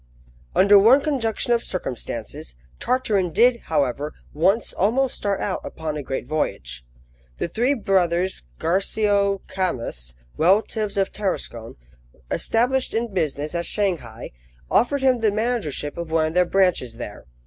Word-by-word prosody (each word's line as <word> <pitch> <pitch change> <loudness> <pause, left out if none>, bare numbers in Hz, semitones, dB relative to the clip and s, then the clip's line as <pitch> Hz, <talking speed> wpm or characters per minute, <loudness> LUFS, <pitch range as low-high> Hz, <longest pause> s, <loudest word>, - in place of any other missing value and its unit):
UNDER 200 +1 +7
one 235 +7 +7
conjunction 245 -6 0
of 235 - +1
circumstances, 125 - -5 0.2
Tartarin 215 -8 +1
did, 240 +7 +4
however, 145 -1 -1 0.2
once 190 +9 +2
almost 250 +7 +1
start 200 -1 -1
out - - -2
upon 155 -1 -5
a 150 - -3
great 135 -2 -4
voyage. 70 - -3 0.5
The - - -2
three 245 - +1
brothers 185 - 0
Garcio 200 +2 +1
Camus, 115 - -3 0.2
relatives 205 +4 +2
of 195 -1 +1
Tarascon, 120 - -4 0.6
established 250 +3 +1
in 230 -2 -1
business 155 -3 -2
at 170 0 -2
Shanghai, 165 - -2 0.4
offered 270 +3 +2
him 255 -2 +4
the 220 -1 +3
managership 205 - -2
of 170 -1 -5
one 160 -1 +2
of 155 - -3
their 180 +1 +4
branches 175 -12 +1
there. 105 - -8
190 Hz, 135 wpm, -23 LUFS, 155-225 Hz, 0.6 s, UNDER